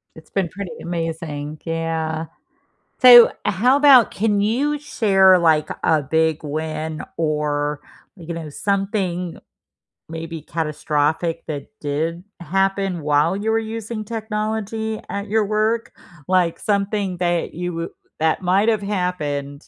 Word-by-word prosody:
It's 160 0 -15
been 190 -4 -1
pretty 200 -2 -7
amazing, 160 -3 -4
yeah. 165 -1 -2 0.8
So, 245 -2 +9
how 245 +8 +3
about 280 -5 +7
can 205 -1 0
you 265 +8 +1
share, 195 -10 +4
like, 160 -3 +3
a 155 -2 +3
big 160 +2 +1
win 155 +1 -4
or, 150 -2 -1 0.4
you 170 -2 -7
know, 165 -2 -6
something 190 0 -2 0.7
maybe 165 0 -6
catastrophic 155 +1 -1
that 145 -2 -5
did 160 +4 -2 0.2
happen 195 +1 0
while 150 +4 +2
you 210 +3 -2
were 225 - +2
using 225 0 -5
technology 220 0 -3
at 200 +1 -4
your 215 0 +2
work? 215 +2 0 0.3
Like, 180 -2 +2
something 200 -2 -1
that 175 -1 -1
you 180 +2 -3
w 165 0 -4 0.3
that 160 +3 +1
might 190 +4 +2
have 215 -3 +1
happened 155 -8 -3
175 Hz, 125 wpm, -21 LUFS, 160-210 Hz, 0.8 s, So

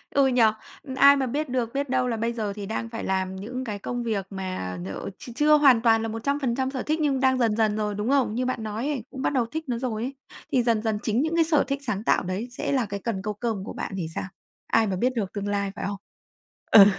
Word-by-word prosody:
Ừ, 275 -1 +5
nhỉ, 250 -2 +3 0.5
ai 280 +1 +8
mà 275 -1 0
biết 290 +3 -2
được 245 -2 -1
biết 280 -1 -1
đâu 255 -1 +1
là 230 -2 -1
bây 230 +2 -1
giờ 215 -4 -2
thì 205 -1 -6
đang 225 +2 -3
phải 225 - -5
làm 190 0 -1
những 245 +7 -5
cái 210 -4 -4
công 245 +3 -3
việc 210 -4 -1
mà 185 - -4
nhờ 95 - -5
ch - - -9
chưa 300 +2 +5
hoàn 265 -6 +6
toàn 225 -1 +4
là 225 - -2
100% 260 +2 -1
sở 260 -3 -3
thích 310 +1 0
nhưng 280 -3 +2
đang 260 0 +3
dần 230 -4 +2
dần 215 -2 +2
rồi, 210 -1 -1
đúng 210 +4 -2
không? 270 -6 +2
Như 255 +1 0
bạn 250 -3 -2
nói 220 +5 -3
ấy, 275 -7 -2
cũng 265 - -7
bắt 280 - 0
đầu 250 -4 +2
thích 315 +7 -5
nó 240 - 0
rồi 230 -3 -2
ấy, 270 +2 -4 0.4
thì 255 -3 +3
dần 230 -3 +2
dần 220 -2 -1
chính 225 +3 +1
những 320 +2 0
cái 335 - +5
sở 315 -2 +3
thích 275 0 -1
sáng 200 0 -1
tạo - - +3
đấy 185 +6 -3
sẽ - - -3
là 260 -4 +2
cái 200 0 -5
cần 220 -5 -2
câu 210 +1 -3
cơm 215 -2 -3
của - - -6
bạn - - -5
thì 170 -4 -2
sao? - - -2 0.4
Ai 225 -1 +3
mà 190 - -1
biết 250 +7 +1
được 200 -5 -2
tương 205 -1 -3
lai, 200 -1 -1
phải - - -4
không? 200 - -3 0.7
Ừ, 200 -3 +11
230 Hz, 270 wpm, -25 LUFS, 210-260 Hz, 0.7 s, Ừ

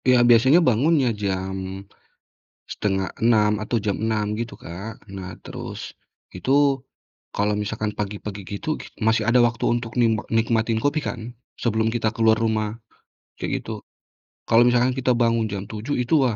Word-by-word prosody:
Iya 125 -1 +6
biasanya 130 +7 +6
bangunnya 135 +3 +3
jam, 95 0 -3 0.9
5.30 105 +2 +1
atau 120 - -1
jam 100 -3 0
6.00 110 -2 0
gitu, 115 0 -4
Kak. 100 +7 -8 0.2
Nah 95 -1 -6
terus, - - -7 0.6
itu 125 +9 -1 0.8
kalau 105 +1 +1
misalkan 105 +1 -2
pagi-pagi 105 0 -4
gitu 100 - -5
gik - - -10
masih 110 0 +3
ada 125 +1 +5
waktu 115 -1 -3
untuk 120 -1 -3
nimba 115 -2 +2
nikmatin 115 0 +1
kopi 145 +2 +2
kan, 120 - -4 0.4
sebelum 110 -1 +1
kita 110 -1 0
keluar 110 -1 +4
rumah, 110 -1 -1 0.6
kayak - - -3
gitu. - - -6 0.7
Kalau 115 +1 +6
misalkan 125 +1 +3
kita 130 0 +2
bangun 115 -1 +2
jam 100 -1 -3
7.00 110 +6 -3
itu, 120 - -2
wah 115 - -1
110 Hz, 145 wpm, -23 LUFS, 105-120 Hz, 0.9 s, Iya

